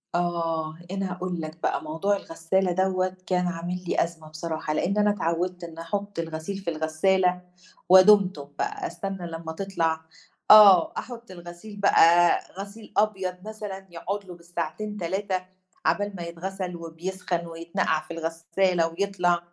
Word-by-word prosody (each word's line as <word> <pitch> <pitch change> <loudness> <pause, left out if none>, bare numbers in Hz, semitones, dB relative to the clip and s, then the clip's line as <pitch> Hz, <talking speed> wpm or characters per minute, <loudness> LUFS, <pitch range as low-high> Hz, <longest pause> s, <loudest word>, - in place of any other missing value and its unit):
آه، 165 -2 -1
أنا 195 -1 -2
هاقول 180 -1 -3
لك 155 +1 -7
بقى - - 0
موضوع 165 +7 0
الغسالة 180 +1 0
دوَّة 185 0 0
كان 180 -1 +1
عامل 175 +1 -4
لي - - +3
أزمة 165 -2 -8
بصراحة، 155 -1 -3
لإن 195 +6 0
أنا 210 0 +4
اتعوّدت 180 -2 -1
إن 165 -1 -8
أحُطّ 200 +3 -4
الغسيل 165 +4 -4
في 190 -3 -4
الغسالة 180 +3 +1 0.5
ودُمتم 190 -5 +6
بقى، 410 -3 -2
أستنى 195 - -5
لمّا 165 0 -6
تطلع 165 -4 -1 0.5
آه، 200 -5 +9
أحُطّ 235 -4 -7
الغسيل 175 +4 -10
بقى 175 -3 +6 0.2
غسيل 205 +2 -9
أبيض 195 -4 +1
مثلًا 205 -3 -7
يقعد 200 +4 -4
له 180 -2 -9
بالساعتين 175 +5 -5
3 185 +1 -2 0.4
عَبال 200 +5 +1
ما 175 - -5
يتغسل 180 +2 -5
وبيسخن 170 +1 -4
ويتنقع 165 -1 -1
في 160 - -9
الغسالة 165 +2 0
ويطلع، 175 0 +1
180 Hz, 140 wpm, -26 LUFS, 165-195 Hz, 0.5 s, آه